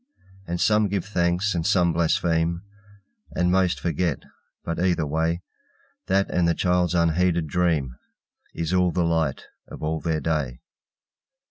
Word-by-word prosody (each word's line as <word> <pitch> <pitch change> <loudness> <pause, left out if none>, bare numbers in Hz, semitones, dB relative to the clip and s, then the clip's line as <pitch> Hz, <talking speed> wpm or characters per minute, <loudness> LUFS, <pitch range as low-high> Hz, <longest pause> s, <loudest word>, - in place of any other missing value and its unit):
And 85 +1 -2 0.3
give 95 -2 -2
some 105 - -15
thanks, 90 +4 +1
and 85 -2 -1
some 85 0 +2
blaspheme, 85 +1 +1 0.7
And 90 0 +2
most 95 -1 +2
forget, 85 -2 -1 0.4
but, 85 0 -3
either 90 -3 +1
way, 80 +4 -1 0.6
That 95 +1 +2
and 90 -1 +2
the 85 - +2
child's 90 0 +1
unheeded 85 0 +2
dream 75 -6 0 0.6
Is 85 +1 -2
all 90 -1 +3
the 90 0 0
light 80 -4 0 0.2
of - - -10
all 80 +1 -1
their 80 -2 -1
day. 75 -6 -2
85 Hz, 140 wpm, -24 LUFS, 80-90 Hz, 0.7 s, all